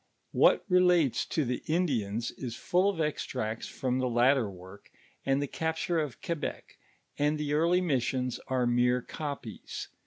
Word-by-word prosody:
What - - +4
relates 180 - +3
to 155 - 0
the 125 +1 -2
Indians 120 - 0
is 120 -3 -6
full 180 +8 +2
of 195 -5 -3
extracts 125 -7 -2
from 130 -1 -2
tlie 130 -1 0
latter 120 -1 +3
work, 95 +2 -13 0.4
and 135 0 +3
the 145 - 0
copture 160 +3 -1
of 150 -5 -4
Quebec, 165 -3 -4 0.4
and 150 +1 +2
the 150 -1 -2
early 170 +4 +3
missions 130 -5 0
are 130 -1 +1
mere 125 +1 +2
copies. 140 -8 -6
135 Hz, 150 wpm, -30 LUFS, 120-160 Hz, 0.4 s, What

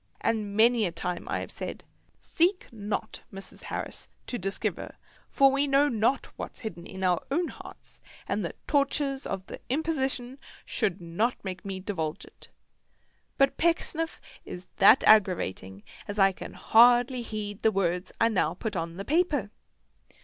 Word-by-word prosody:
And 215 -3 -1
many 230 -1 +5
a - - -4
time 175 +1 -4
have - - -8
I - - -1
said, - - -7 0.4
"Seek 360 -3 0
not, 210 0 -4
Mrs. 195 -1 -10
Harris, - - -5 0.2
to 245 - -4
diskiver; 195 +1 -3 0.3
for 275 -1 +5
we 275 +1 +1
know 280 +1 +4
not 230 +3 0
wot's - - -7
hidden 175 -7 -6
in 190 0 -7
our 180 -2 +2
own 335 +5 0
hearts, - - -12 0.3
and - - -1
the - - -4
torters 280 -1 +1
of 190 - -4
the - - -9
Imposition 270 -3 -1 0.3
should 190 -1 -1
not 175 +9 0
make 185 -1 -5
me 195 -1 -5
diwulge 175 -4 -4
it." - - -17 0.9
But 275 -1 +3
Pecksniff 330 -1 0 0.2
is 180 +1 -8
that 195 0 +7
aggravating 100 - +3 0.2
as 205 - -5
I 195 -1 +5
can 185 - -9
hardly 245 +2 +5
heed 210 -3 -5
the 220 - +4
words 180 -2 -1
I 230 - +5
now 180 -6 +1
put 210 +2 -4
on 165 0 -3
the 195 - -5
paper. 295 - +1
215 Hz, 155 wpm, -28 LUFS, 190-270 Hz, 0.9 s, that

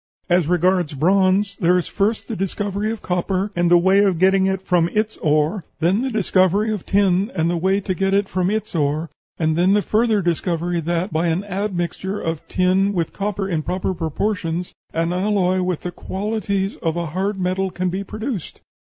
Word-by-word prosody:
As 175 -3 +3
regards 180 -2 +1
bronze, 190 +5 +2
there 180 -1 +4
is 180 - -1
first 210 +3 -1
the 225 - -4
discovery 200 +2 -2
of 225 - -6
copper, 185 +3 -1
and 175 0 +2
the 175 - +7
way 190 +3 +4
of 190 -4 +2
getting 190 +2 +4
it 190 -1 -1
from 175 -3 +2
its 215 +1 0
ore; 155 +5 +1 0.2
then 180 +7 +2
the 265 - -1
discovery 205 -1 +2
of 205 - -6
tin, 195 0 +2
and 165 +1 +1
the - - 0
way 190 +4 +1
to 190 -1 -2
get 195 +1 0
it 200 0 +2
from 185 -1 0
its 215 +1 -2
ore; 155 0 -1 0.3
and 160 -1 +1
then 180 +3 +3
the 210 - +2
further 215 -2 +2
discovery 175 0 -1
that, 170 +3 -2
by 165 +2 +1
an 170 +4 0
admixture 190 -1 -3
of 165 -1 -3
tin 190 +2 +2
with 170 -4 -2
copper 200 -1 -2
in 165 -5 -1
proper 185 +5 -2
proportions, 170 +1 -2 0.2
an 165 +1 -1
alloy 185 -1 +1
with 180 -3 -1
the 180 - -4
qualities 200 +1 -2
of 165 0 -2
a 170 - -1
hard 190 +5 -2
metal 185 +1 0
can 180 0 -2
be 190 +3 -3
produced. 215 - -5
185 Hz, 195 wpm, -21 LUFS, 170-200 Hz, 0.3 s, the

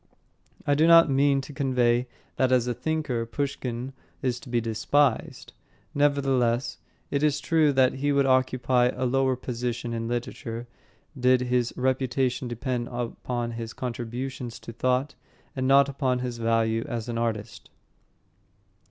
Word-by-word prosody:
I 145 - +3
do 155 +3 +4
not 165 -3 +7
mean 140 0 +3
to 145 - -10
convey 125 -3 +1 0.3
that 130 -1 +2
as 125 -2 +3
a 125 - -1
thinker 150 -4 -2
Pushkin 130 0 -4 0.3
is 125 -2 0
to 130 - -13
be 120 -1 +1
despised. 115 +4 0 0.4
Nevertheless, 135 -4 +1 0.3
it 140 - 0
is 150 -1 +2
true 160 -3 +3
that 130 -1 +4
he 145 +2 -1
would 140 -1 +3
occupy 130 -1 +2
a 130 +1 -2
lower 130 +1 +2
position 120 -1 -4
in 115 0 -3
literature 120 -1 -4 0.5
did 125 -1 +3
his 125 -1 0
reputation 130 0 0
depend 120 0 -3
upon 120 0 -3
his 115 0 -6
contributions 125 0 -5
to 115 +1 -9
thought 130 +4 0 0.4
and 130 -1 -1
not 140 +1 +6
upon 135 -2 0
his 125 -1 -4
value 115 0 +1
as 115 -1 -4
an 115 -1 -3
artist. 110 -3 -4
125 Hz, 145 wpm, -26 LUFS, 120-135 Hz, 0.5 s, not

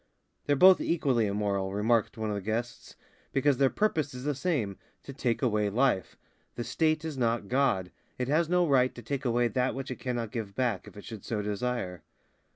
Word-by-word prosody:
"They're 145 - +3
both 185 +5 +7
equally 130 -9 +1
immoral," 100 -1 -1
remarked 115 +2 +1
one 110 -1 -2
of 105 - -1
the 100 - -3
guests, 115 +4 -4 0.4
"because 135 0 +3
their 135 0 +4
purpose 155 -10 0
is 125 - -7
the 145 +1 0
same, 135 - -1 0.2
to 140 - -8
take 125 -2 -1
away 105 -4 +2
life. 120 -3 +1 0.4
The 120 - -3
State 155 +6 0
is 150 -4 -4
not 115 -3 0
God. 125 -9 +1 0.3
It 125 - -2
has 155 +3 +2
no 180 -1 +3
right 130 -3 +3
to 120 - -9
take 135 +3 -3
away 120 0 +2
that 125 0 0
which 135 0 -5
it 130 - -4
cannot 120 -4 -3
give 110 -5 -5
back, 120 -8 -1
if - - -13
it 105 - -9
should 110 -4 -8
so 105 -3 -2
desire." 105 -3 -3
125 Hz, 200 wpm, -29 LUFS, 105-140 Hz, 0.4 s, both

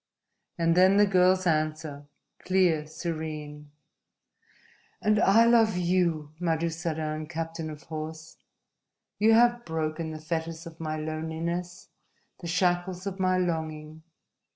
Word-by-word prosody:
And 165 -1 +2
then 185 +3 +5
the 205 - +6
girl's 185 -1 +3
answer, 155 -3 -1 0.3
clear, 180 -5 +2
serene: 155 -2 -6 1.3
"And 215 -1 +2
I 225 +2 +5
love 225 -4 +4
you, 170 -4 0
Madusadan, 160 -2 -2
captain 165 0 -4
of 150 -1 -9
horse! 160 0 -7 0.8
You 220 +2 +5
have 240 +1 +4
broken 160 -1 -3
the 155 0 -6
fetters 160 +1 -4
of 165 -1 -11
my 155 -1 -3
loneliness, 160 +3 -4 0.5
the 170 - -7
shackles 180 +1 0
of 195 -1 -4
my 185 -1 +2
longing! 160 -3 -3
165 Hz, 115 wpm, -27 LUFS, 155-185 Hz, 1.3 s, the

